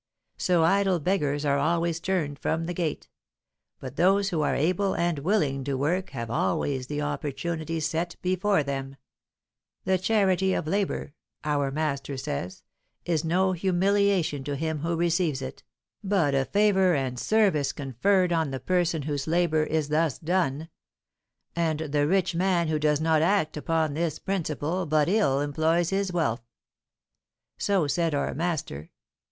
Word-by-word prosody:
So 175 -3 +2
idle 195 +1 +3
beggars 150 -4 0
are 140 -1 +2
always 170 0 0
turned 165 -6 -2
from 160 +2 -1
the 175 - -3
gate; 165 -3 -3 0.7
but 130 +1 -8
those 195 +3 +3
who 165 -5 -1
are 150 - +1
able 185 +6 +1
and 170 -3 0
willing 145 -5 0
to 140 -1 -1
work 175 +7 0
have 115 -4 -5
always 125 +6 -1
the 150 +1 -3
opportunity 155 +3 -3
set 165 +2 -2
before 185 -1 +1
them: 135 -1 -4 0.9
the 190 0 +1
charity 190 -2 +2
of - - -2
labour, 190 -4 -2 0.3
our 145 -2 0
master 140 -1 -2
says, 90 - -5 0.4
is 165 -3 0
no 185 +3 +2
humiliation 185 -3 +1
to 145 0 -2
him 160 +1 -2
who 165 +3 -1
receives 170 -4 +1
it, 130 -1 -7 0.4
but 190 -8 +1
a 135 -1 +2
favour 190 -2 +3
and 130 -3 -2
service 190 -10 +2
conferred 175 - +1
on 160 -3 +1
the 135 -1 -4
person 175 -3 0
whose 145 -1 -3
labour 165 -1 +2
is 155 -2 -1
thus 155 -2 +1
done; 165 -3 -1 0.9
and 165 -2 0
the 145 -2 0
rich 185 +1 +1
man 175 -1 +1
who 155 -1 0
does 150 -1 +2
not 160 -1 +2
act 170 -2 +1
upon 160 0 0
this 160 0 -1
principle 170 -1 -2
but 150 -1 +2
ill 180 -9 +2
employs 160 +4 +1
his 195 -1 0
wealth. 155 -10 0 1.2
So 195 -5 +2
said 165 +2 0
our 140 - -1
master. 150 - -3
160 Hz, 150 wpm, -26 LUFS, 145-180 Hz, 1.2 s, idle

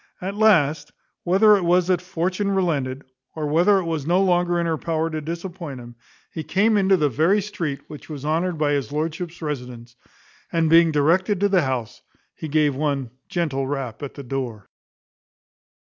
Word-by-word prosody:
At 190 +2 -4
last, 185 -9 +3 0.3
whether 205 +4 +5
it 190 - -3
was 175 +1 +3
that 180 -1 +1
Fortune 185 +3 -2
relented, 145 -9 -1 0.3
or 155 -1 -3
whether 175 +7 +4
it 190 - 0
was 160 -4 -3
no 175 +2 +3
longer 175 -1 +2
in 170 - 0
her 160 -2 -1
power 165 0 -1
to 155 0 -3
disappoint 170 -3 -6
him, 120 0 -11 0.4
he 160 - -4
came 210 +6 +2
into 195 -1 +4
the 150 -3 +2
very 160 - +2
street 170 -9 -4
which 150 +1 -11
was 145 -2 -7
honoured 165 +3 0
by 150 -1 +1
his 140 -1 -1
lordship's 160 +3 -4
residence; 125 -5 -6 0.6
and, 165 -2 +1
being 165 0 +6
directed 175 +7 +2
to 205 - +3
the 190 -2 +3
house, 130 -6 -3 0.3
he 160 - -7
gave 150 -1 +2
one 140 -4 -2 0.2
gentle 140 -6 -1
rap 135 -4 -4
at 145 - -7
the 140 - -8
door. 120 -6 -5
160 Hz, 175 wpm, -22 LUFS, 145-180 Hz, 0.6 s, being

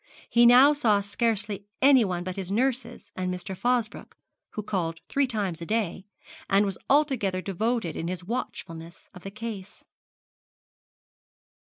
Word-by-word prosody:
He 235 0 +6
now 260 +5 +8
saw 230 -8 +3
scarcely 205 -1 -2
anyone 230 -10 +4
but 185 0 -5
his 190 -1 -5
nurses 250 -2 -1
and 185 0 -2
Mr. 180 +1 -5
Fosbroke, 240 +1 -2 0.4
who 215 - -4
called 165 -5 -2
three 280 -1 +1
times 200 -8 -3
a - - -4
day, 205 -4 -2 0.4
and 200 +1 +4
was 195 -2 -4
altogether 265 -10 +2
devoted 210 +1 -2
in 165 - -4
his 180 0 -4
watchfulness 170 -6 -6
of 180 - -12
the 195 - -7
case. 205 -2 -8
205 Hz, 140 wpm, -26 LUFS, 185-240 Hz, 0.4 s, now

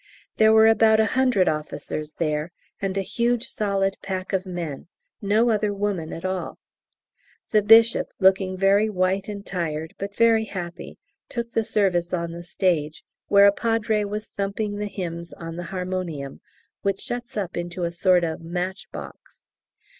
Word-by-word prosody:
There 220 0 +6
were 220 0 +7
about 220 0 +5
a 220 - +5
hundred 255 -8 +3
officers 155 0 -3
there, 155 0 -2 0.3
and 195 0 -2
a 195 - 0
huge 235 +3 0
solid 195 -2 -1
pack 190 -1 -4
of 190 0 0
men; 170 -6 -5 0.3
no 220 +4 +3
other 210 -1 +1
woman 195 -5 -2
at 165 - -6
all. 185 -1 -3 0.9
The 215 - +5
Bishop, 225 +2 +6
looking 190 0 +3
very 200 +3 +3
white 190 0 0
and 200 -1 -6
tired 160 -3 -3
but 200 +1 -5
very 225 -1 +4
happy, 175 -4 -7 0.3
took 235 -1 -4
the 225 - +1
service 185 -5 +1
on 170 -1 -3
the 170 +1 -7
stage, 170 -3 -1 0.2
where 200 0 +6
a 200 - +7
Padre 225 0 0
was 210 +1 -5
thumping 205 +1 -2
the 210 0 -2
hymns 170 -4 -6
on 165 -1 -7
the 175 0 -5
harmonium 180 -7 -4 0.4
(which 195 -1 0
shuts 245 0 -5
up 190 -4 -3
into 175 +1 -4
a 170 - -1
sort 180 +1 +3
of 160 -1 -2
matchbox). 180 +3 -6
195 Hz, 160 wpm, -24 LUFS, 175-210 Hz, 0.9 s, were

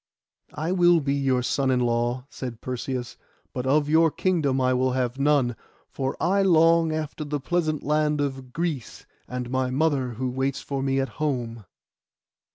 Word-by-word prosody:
'I 155 +4 -2
will 175 -2 +5
be 140 -2 -1
your 135 -3 +1
son 135 +2 0
in 130 -1 +2
law,' 120 +1 0
said 125 -5 -7
Perseus, 125 0 -4 0.4
'but 125 0 -3
of 145 +2 +3
your 160 +2 +4
kingdom 155 -6 0
I 130 0 +2
will 130 0 +1
have 125 0 -1
none, 140 -4 +2 0.4
for 135 -1 -3
I 190 +4 +2
long 165 -3 +4
after 155 0 -3
the 145 0 -3
pleasant 155 +1 -1
land 150 0 +1
of 135 -3 -3
Greece, 155 -6 -4 0.2
and 125 -1 -5
my 130 -1 0
mother 135 -2 0
who 125 +2 -3
waits 135 +1 -1
for 140 -1 -4
me 135 0 +1
at 135 - -1
home. 120 -7 -2
135 Hz, 165 wpm, -25 LUFS, 125-155 Hz, 0.4 s, will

